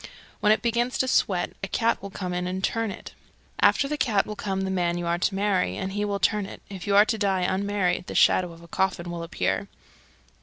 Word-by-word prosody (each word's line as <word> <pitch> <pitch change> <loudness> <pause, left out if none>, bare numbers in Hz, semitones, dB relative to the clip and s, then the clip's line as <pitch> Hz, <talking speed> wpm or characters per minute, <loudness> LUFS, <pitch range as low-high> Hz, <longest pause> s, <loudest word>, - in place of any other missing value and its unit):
When 210 - +4
it 215 - +2
begins 240 +1 0
to 260 - +1
sweat 185 -7 +1
a - - -1
cat 230 +3 +1
will 200 - -6
come 185 -2 -5
in 180 0 -2
and 185 +1 -3
turn 225 +1 0
it. 195 - -9 0.5
After 280 - +4
the 300 +1 -3
cat 210 -5 +2
will 210 - -6
come 195 -2 -2
the 190 0 -2
man 175 -2 0
you 175 - -3
are 170 0 0
to 190 - 0
marry, 195 -2 +1
and 190 0 -4
he 205 +1 -1
will 200 -1 -1
turn 205 0 +1
it. - - -10
If 195 0 -8
you 200 - +2
are 205 +1 +8
to 225 -1 -1
die 195 -2 +1
unmarried, 190 -1 0
the - - -6
shadow 180 -2 +4
of 165 0 -14
a - - -13
coffin 180 -1 -1
will 170 -1 -5
appear. 95 - -1
195 Hz, 240 wpm, -25 LUFS, 180-210 Hz, 0.5 s, are